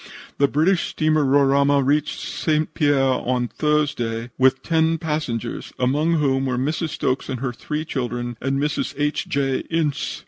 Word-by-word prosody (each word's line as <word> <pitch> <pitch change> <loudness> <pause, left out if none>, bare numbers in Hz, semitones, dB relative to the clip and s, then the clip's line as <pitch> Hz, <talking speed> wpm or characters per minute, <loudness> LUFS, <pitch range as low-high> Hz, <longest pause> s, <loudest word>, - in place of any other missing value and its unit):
"The 140 - +5
British 165 +6 +2
steamer 155 -1 +1
Roraima 140 0 +3
reached 150 +2 +1
St. 155 -1 -1
Pierre 140 -4 +2
on 125 -1 0
Thursday 125 -6 -1
with 130 0 +3
ten 165 0 +2
passengers, 150 -8 -3
among 145 +6 +1
whom 135 -4 +1
were 125 -1 -1
Mrs. 155 +5 -1
Stokes 130 -2 -2
and 130 - -3
her 125 -1 -3
three 150 +5 -4
children, 120 -4 -3
and 135 +1 0
Mrs. 150 +1 -2
H. 150 +1 -1
J. 135 -2 0
Ince. 160 -4 -1
140 Hz, 150 wpm, -22 LUFS, 130-155 Hz, -, The